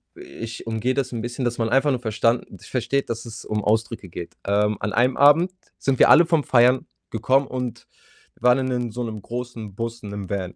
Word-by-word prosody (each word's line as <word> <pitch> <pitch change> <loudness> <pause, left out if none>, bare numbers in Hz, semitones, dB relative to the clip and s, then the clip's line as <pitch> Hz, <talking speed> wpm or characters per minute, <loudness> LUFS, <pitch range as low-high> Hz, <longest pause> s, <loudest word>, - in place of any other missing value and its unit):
ich 115 0 -8
umgehe 115 +3 0
das 135 -1 -1
‘n 115 -2 -4
bisschen, 120 +2 -4
dass 120 0 -1
man 115 -1 0
einfach 135 +5 +3
nur 130 - 0
verstanden 115 -3 -1
versteht, 125 +6 -2
dass 115 0 -4
es 115 0 -9
um 105 -1 -2
Ausdrücke 110 -1 -1
geht. 85 0 -8
Ähm, 105 +1 +1
an 105 0 -3
einem 125 +4 +2
Abend 150 +6 +5 0.3
sind 135 -1 0
wir - - +7
alle 170 +2 +8
vom 165 -3 +2
Feiern 125 0 +4 0.2
gekommen 130 +5 +2
und 125 -2 -5 0.5
waren 125 +2 +4
in 130 - -1
'nen 125 -2 -2
so 120 +3 -4
‘nem 110 -2 -5
großen 120 -4 -6
Bus, 115 +2 -5
in 105 - -7
‘nem 100 -2 -6
Van. 95 -2 -3
120 Hz, 210 wpm, -23 LUFS, 110-130 Hz, 0.5 s, alle